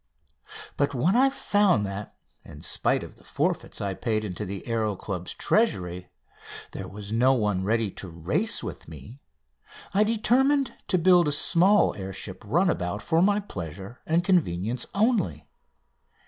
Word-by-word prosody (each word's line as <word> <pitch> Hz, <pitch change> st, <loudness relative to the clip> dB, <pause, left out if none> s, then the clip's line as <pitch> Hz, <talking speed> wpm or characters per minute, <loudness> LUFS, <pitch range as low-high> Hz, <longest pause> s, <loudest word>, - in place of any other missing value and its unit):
But 140 Hz, -1 st, 0 dB
when 165 Hz, -, +2 dB
I 265 Hz, +2 st, +5 dB
found 205 Hz, -, +2 dB
that, 100 Hz, +1 st, -6 dB, 0.3 s
in -, -, -12 dB
spite -, -, 0 dB
of -, -, -11 dB
the -, -, -21 dB
forfeits -, -, -2 dB
I 100 Hz, -1 st, -2 dB
paid 110 Hz, +1 st, -2 dB
into 100 Hz, +1 st, -5 dB
the 100 Hz, 0 st, -5 dB
Aéro 110 Hz, -4 st, -1 dB
Club's 90 Hz, -3 st, -5 dB
treasury, 90 Hz, -, 0 dB, 0.6 s
there -, -, -7 dB
was 100 Hz, +1 st, -9 dB
no 125 Hz, +4 st, +4 dB
one 105 Hz, -6 st, 0 dB
ready 110 Hz, 0 st, 0 dB
to 95 Hz, -, -8 dB
race 90 Hz, -, -1 dB
with -, -, -7 dB
me 80 Hz, -, -11 dB, 0.7 s
I 205 Hz, +2 st, +4 dB
determined 250 Hz, +5 st, +2 dB
to 190 Hz, -, +2 dB
build 175 Hz, -1 st, +5 dB
a -, -, +1 dB
small 180 Hz, +7 st, +4 dB
air 95 Hz, -1 st, -6 dB
ship -, -, -7 dB
runabout 90 Hz, +4 st, 0 dB
for 165 Hz, -1 st, +2 dB
my 205 Hz, +2 st, +3 dB
pleasure 95 Hz, -, -8 dB
and 165 Hz, +2 st, +2 dB
convenience 125 Hz, -, 0 dB
only. 225 Hz, +4 st, +1 dB
120 Hz, 150 wpm, -26 LUFS, -, 0.7 s, I